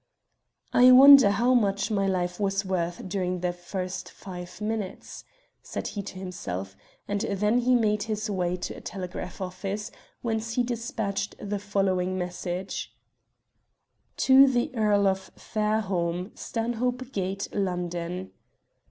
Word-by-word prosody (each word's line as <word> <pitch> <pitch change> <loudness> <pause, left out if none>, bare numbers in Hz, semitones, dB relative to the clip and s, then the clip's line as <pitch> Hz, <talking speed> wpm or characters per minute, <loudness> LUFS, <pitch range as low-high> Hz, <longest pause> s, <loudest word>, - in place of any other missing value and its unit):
"I 250 +1 +8
wonder 270 -3 +10
how 235 +6 +3
much 200 -4 +1
my 195 -2 +1
life 180 -1 -1
was 195 0 0
worth 175 -1 -2
during 180 -1 -2
the 180 -1 0
first 180 +1 -5
five 180 -2 -9
minutes?" 210 -2 -4 0.4
said - - -5
he 205 - -4
to 195 -1 -8
himself; 100 - -5 0.3
and 205 0 -1
then 210 +4 +1
he 250 +1 +3
made 210 -3 +2
his 215 0 -2
way 180 -3 -1
to 180 - -5
a - - -10
telegraph 185 -2 -6
office, 195 +4 -4 0.3
whence 225 -1 -2
he 245 - +3
despatched 225 -4 -3
the 205 0 -3
following 190 -2 0
message 180 +1 -4 1.2
"TO 265 +1 +7
THE 245 -2 +1
EARL 210 -3 +3
OF 190 0 0
FAIRHOLME, 195 -4 -1
"STANHOPE 245 +2 -2
GATE, 195 -1 -3
LONDON. 180 -1 -3
200 Hz, 130 wpm, -27 LUFS, 180-220 Hz, 1.2 s, wonder